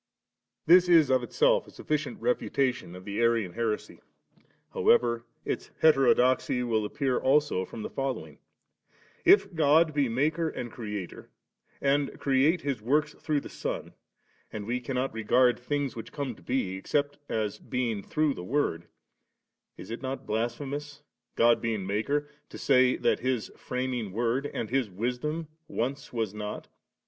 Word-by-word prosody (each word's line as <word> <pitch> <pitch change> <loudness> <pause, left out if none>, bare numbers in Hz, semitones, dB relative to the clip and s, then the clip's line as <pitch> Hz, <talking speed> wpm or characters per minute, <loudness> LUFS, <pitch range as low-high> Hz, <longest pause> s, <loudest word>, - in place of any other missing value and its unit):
This 180 +2 +6
is 160 -6 +6
of 130 -1 +4
itself - - +2
a - - -12
sufiScient - - -3
refutatioii 135 - -1
of 90 0 -11
the 100 +2 -2
Arian 115 -6 +2
heresy; 115 -2 -3 0.7
however, 120 -1 +3 0.2
its - - -3
heterodoxy 130 -4 +4
will 110 -3 0
appear 130 +3 0
also 140 -8 +2
from 110 - -8
the - - -4
following:— 135 -1 -4 0.9
K 385 - +10 0.2
God 160 0 +4
be 145 -4 +1
Maker 155 +7 +1
and 120 -5 -6
Creator, 105 -6 -6 0.5
and 140 0 +1
create 140 +5 +3
His 140 -6 -2
works 150 +6 +1
through 150 -2 0
the - - -8
Son, - - -5 0.6
and 105 -1 -5
we 120 +3 -1
cannot 130 +1 -2
regard 120 +3 +3
things 140 +1 -2
which 115 - -8
come 140 -4 -3
to - - -18
be, 100 -8 -1
except 145 +8 -1
as 105 -2 -2
being 120 -5 -2
through 155 +6 0
the 90 - -8
Word, 90 - -1 0.9
is - - -9
it 115 - -5
not 135 0 -4
blasphemous, 140 +6 -3 0.3
God 120 0 +4
being 110 -5 -2
Maker, 140 +10 -1 0.2
to - - -9
say, 130 -2 +4
that - - +1
His 130 -3 -1
Framing 125 -5 -3
Word 120 +5 0
and 115 - -5
His 130 -4 +1
Wisdom 125 - -3 0.2
once 135 +5 -3
was 110 -4 -2
not? 105 -1 -6
125 Hz, 150 wpm, -28 LUFS, 115-145 Hz, 0.9 s, K